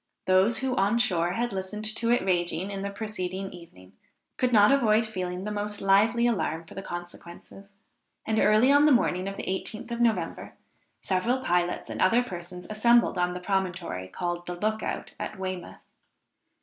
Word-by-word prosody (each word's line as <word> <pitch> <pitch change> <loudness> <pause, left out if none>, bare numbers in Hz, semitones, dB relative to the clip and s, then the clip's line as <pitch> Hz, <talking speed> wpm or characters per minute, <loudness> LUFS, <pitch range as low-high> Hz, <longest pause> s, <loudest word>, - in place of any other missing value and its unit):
Those 190 +5 +3
who 265 -1 -1
on 200 +4 +2
shore 180 -7 +1
had 240 +2 -2
listened 195 +3 -4
to 225 +2 0
it 240 - +3
raging 175 0 0
on 195 - -4
the 200 - -3
preceding 195 -2 -4
evening, 95 - -14 0.4
could 250 -1 0
not 210 -1 +6
avoid 225 -5 +3
feeling 185 -3 -4
the 210 - -4
most 210 0 -3
lively 215 +5 +3
alarm 165 -7 -1
for - - -13
the 195 - -6
consequences; 175 +2 -10 0.5
and 220 0 +1
early 215 +5 +5
on 285 +1 +6
the - - +5
morning 190 -7 +2
of 195 - -5
the - - -5
18th 215 +5 -4
of 235 0 -2
November, 230 -2 -1 0.5
several 200 +7 0
pilots 180 -7 -1
and - - -5
other 230 +6 +4
persons 180 -3 -8
assembled 235 -2 +3
on 180 0 0
the - - -4
promontory 180 - -2
called 175 - -4
the 175 - -4
Look 215 +4 -1
out - - -4
at 215 - -5
Weymouth. 185 -2 -6
195 Hz, 175 wpm, -27 LUFS, 180-225 Hz, 0.5 s, not